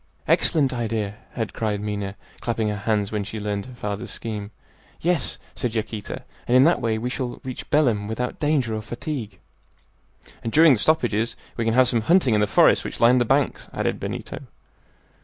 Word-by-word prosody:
"Excellent 155 -4 +3
idea!" 110 -4 -2 0.2
had 115 -3 -3
cried 105 -2 -1
Minha, 100 -1 -3 0.2
clapping 115 -2 -1
her 105 - -1
hands, 105 -1 0
when 105 -2 -1
she 110 +2 -6
learned 105 0 -3
her 130 - -11
father's 105 -3 -4
scheme. 105 -3 -5 0.5
"Yes," 175 -2 +1 0.2
said 120 -4 -3
Yaquita, 110 -1 -4 0.2
"and 125 - +5
in 130 - +7
that 165 -2 +3
way 115 -2 0
we 115 +3 -3
shall 125 -2 -4
reach 130 -1 -7
Belem 120 -9 +2
without 120 +3 -3
danger 145 -7 +1
or 110 - -2
fatigue." 115 -2 -5 1.1
"And 115 - -2
during 160 +1 +7
the 115 - 0
stoppages 115 -7 +1 0.2
we 115 - -2
can 115 0 +1
have 130 0 +6
some 120 -2 +1
hunting 160 -2 +4
in 105 - +3
the 105 - +2
forests - - +5
which - - -6
line 120 +2 +6
the 120 - +2
banks," 135 +4 +1
added - - -1
Benito. - - -5
115 Hz, 185 wpm, -24 LUFS, 105-130 Hz, 1.1 s, in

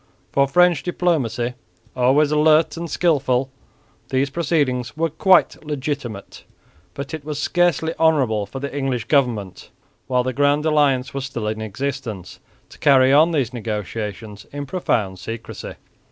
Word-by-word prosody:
For 140 0 +3
French 175 +1 +4
diplomacy, 140 -10 -1 0.4
always 135 +4 +3
alert 155 +1 +4
and 170 0 -5
skilful, 135 -6 +1 0.6
these 135 +1 0
proceedings 140 -6 -1
were 165 -1 0
quite 185 +3 +3
legitimate; 140 -7 -5 0.5
but 140 +2 -6
it 155 -2 -5
was 150 -1 -5
scarcely 165 0 +1
honourable 130 -11 +2
for 135 - -7
the 140 +1 -5
English 135 -4 -2
government, 120 - 0 0.4
while 125 -1 +1
the 130 +1 -2
Grand 145 +3 +2
Alliance 140 -4 +2
was 135 -1 -3
still 120 -5 -4
in 110 0 -3
existence, 110 -3 -5 0.3
to - - -16
carry 135 -2 +5
on 155 +4 +6
these 135 -7 -1
negotiations 105 -1 -5
in 145 0 -5
profound 110 - -1
secrecy. 115 +4 -7
135 Hz, 140 wpm, -21 LUFS, 120-150 Hz, 0.6 s, on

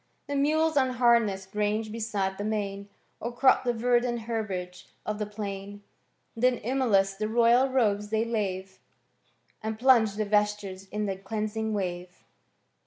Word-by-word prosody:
The 285 - -4
mules 315 +3 +2
nnhamess'd 235 -7 +2
range 210 +1 0
beside 205 -4 -2
the - - -2
main. 200 -2 -3 0.3
Or 235 - -4
crop 260 +2 +4
the 245 - +1
verdant 240 0 +1
herbage 200 -6 -4 0.2
of 215 0 -3
the 210 - -2
plain. 205 -1 -6 0.5
Then 250 +2 +3
emulous 220 -6 +1
the 215 +2 -3
royal 235 +3 +4
robes 210 -5 +1
they 220 +1 +1
Iwne, 195 -4 -3 0.8
And 220 0 -3
plunge 230 -4 +4
the 215 0 -1
vestures 205 -2 0
in 210 +2 -3
the 195 -2 -2
deanshig 215 +2 -3
ware. 180 -3 -3
215 Hz, 140 wpm, -27 LUFS, 200-235 Hz, 0.8 s, crop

